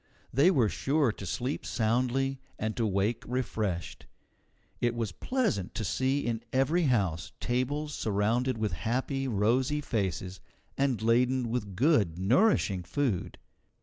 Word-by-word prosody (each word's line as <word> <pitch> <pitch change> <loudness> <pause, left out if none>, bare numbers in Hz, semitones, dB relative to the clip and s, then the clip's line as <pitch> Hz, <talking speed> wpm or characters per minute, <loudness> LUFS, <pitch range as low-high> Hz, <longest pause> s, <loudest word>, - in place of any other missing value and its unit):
They 140 +8 +5
were 135 - +3
sure 140 +3 +1
to 100 - -9
sleep 125 - -2
soundly, 130 +4 0 0.2
and 110 0 -2
to 115 -2 0
wake 100 +3 0
refreshed. 110 -8 -3 0.7
It 120 -1 +1
was 115 -4 -2
pleasant 110 - -1
to 110 - -2
see 130 +8 +1
in 115 -1 -1
every 155 +7 +2
house 95 - 0
tables 145 +5 -1
surrounded 115 +4 0
with 110 -1 -1
happy, 130 - -1
rosy 125 +6 +1
faces, 95 - -2 0.4
and 135 -5 +1
laden 125 +2 +2
with 105 -5 -3
good 110 - +3
nourishing 100 - +3
food. 100 +2 -2
120 Hz, 130 wpm, -29 LUFS, 105-135 Hz, 0.7 s, They